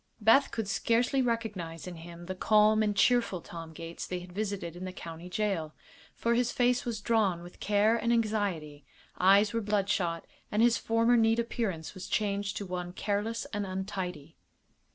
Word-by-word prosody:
Beth 230 +6 +5
could 225 -3 -3
scarcely 240 +6 +2
recognize 210 -9 -3
in 180 -2 -7
him 170 +1 -10
the 185 - -4
calm 215 +3 +4
and 210 -1 +1
cheerful 230 -2 +3
Tom 165 -1 -9
Gates 165 +1 -7
they 180 - -3
had 180 0 -11
visited 200 -4 -3
in 180 - -7
the 185 - -4
county 170 0 -9
jail; 185 -6 -2 0.4
for 235 - +1
his 240 0 +1
face 250 +2 +2
was 230 -3 -3
drawn 200 -6 +1
with 175 - -13
care 210 +2 +3
and 235 +1 0
anxiety, 200 -11 -1 0.4
eyes 200 +4 +5
were 230 - 0
bloodshot, 200 -5 0 0.3
and 210 +2 +3
his 240 -1 +5
former 230 +1 +3
neat 225 -1 +4
appearance 225 -8 -2
was 185 -2 -8
changed 200 -1 -1
to 200 - -4
one 180 -1 -5
careless 210 +4 -2
and 205 0 -1
untidy. 185 -5 -5
205 Hz, 175 wpm, -30 LUFS, 180-225 Hz, 0.4 s, Beth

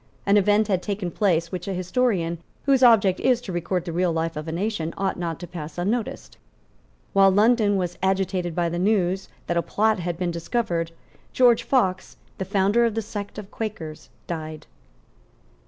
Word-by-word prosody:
An 200 - +4
event 205 +1 +4
had 190 -4 +1
taken 195 -3 -3
place 170 -5 +1
which 180 0 -5
a 195 - -2
historian, 185 -3 0 0.3
whose 270 -2 +4
object 210 -7 +5
is 250 -2 +3
to 205 - -7
record 175 0 -2
the 170 - -4
real 175 +1 +1
life 165 0 -2
of 155 +1 -5
a - - -3
nation, 170 -2 -2
ought 195 -1 0
not 170 -3 -4
to - - -5
pass 165 -2 -8
unnoticed. 210 +6 -3 0.8
While 195 0 +6
London 210 +1 +3
was 180 -2 -3
agitated 190 -2 0
by 175 -1 +1
the 170 +1 -2
news 190 -1 +1 0.2
that 170 - -1
a - - +3
plot 215 +3 +1
had 175 -1 -3
been 180 -1 -1
discovered, 170 -1 -1 0.4
George 245 -2 +5
Fox, 190 -8 0 0.2
the 190 - -2
founder 200 +4 +2
of 230 -2 +1
the 225 - -1
sect 205 -1 -6
of 205 -2 -8
Quakers, 185 -9 -6 0.2
died. 155 -2 -6
190 Hz, 180 wpm, -24 LUFS, 170-210 Hz, 0.8 s, While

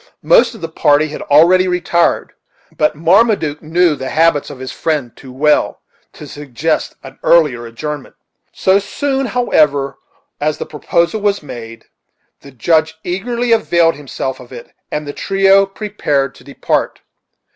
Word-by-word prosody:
Most - - +4
of 220 - -13
the 165 - -3
party 155 -1 +2
had 150 - -7
already 175 +6 +4
retired, 175 -1 0 0.4
but 150 0 +1
Marmaduke 170 -2 +2
knew 165 0 +2
the 130 -1 -6
habits 160 -2 +2
of 145 - -9
his 130 0 -7
friend 150 -7 -2
too 130 - -13
well 150 +4 +1 0.3
to - - -11
suggest 145 +2 -3
an 135 0 -12
earlier 145 -9 +3
adjournment. 145 +5 -7 0.4
So 190 +1 +2
soon, 270 +5 -2
however, 150 - +1 0.4
as 150 +1 -1
the - - -5
proposal 170 +7 -1
was 205 -4 0
made, 115 -4 -9 0.5
the 140 - -14
Judge 160 +4 0
eagerly 235 +7 -2
availed 170 -7 +3
himself 135 -2 -5
of 125 0 -14
it, 120 -2 -11 0.2
and 150 0 -3
the 145 - -5
trio 195 0 +3
prepared 195 -10 -2
to - - -18
depart. - - -2
155 Hz, 145 wpm, -16 LUFS, 140-190 Hz, 0.5 s, Most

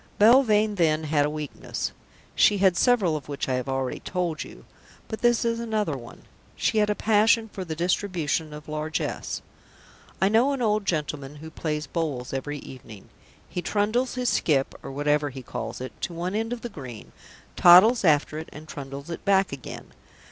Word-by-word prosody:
Belvane, 215 -2 +5
then, 160 -2 +2
had 150 -1 +2
a - - -2
weakness. 150 -1 -4 0.4
She 205 - +4
had 190 -2 +4
several 205 -8 +3
of 145 -2 -6
which 140 - -3
I 130 - 0
have 125 +1 -2
already 135 -1 -2
told 175 -4 -2
you, - - -13 0.4
but 220 - -6
this 240 -1 +3
is 230 0 0
another 215 -9 -1
one. 120 -3 -11 0.3
She 220 - +1
had 210 0 +2
a 210 - +1
passion 220 +1 +3
for 190 - -4
the 165 -3 -5
distribution 170 -3 -1
of 150 0 -10
largesse. 155 0 -3 0.8
I 190 - +4
know 235 +7 +3
an 270 - -3
old 210 -2 +1
gentleman 150 -3 -2
who 160 +2 -10
plays 150 -1 -3
bowls 145 -8 -3
every 145 +2 -3
evening. 115 -7 -12 0.4
He 180 - -4
trundles 215 +7 0
his 250 -1 0
skip 135 -4 +1
(or - - -6
whatever 145 +1 +1
he 130 -1 -9
calls - - -5
it) 130 0 -6
to - - -3
one 175 +3 -3
end 225 +2 -1
of 245 -1 -4
the 240 - -5
green, 130 - -9 0.4
toddles 190 +8 +7
after 155 -2 +3
it, 160 - -8
and 155 +1 -11
trundles 140 +2 -7
it 170 - -6
back 195 -1 +3
again. 135 -4 -8
165 Hz, 185 wpm, -25 LUFS, 145-210 Hz, 0.8 s, toddles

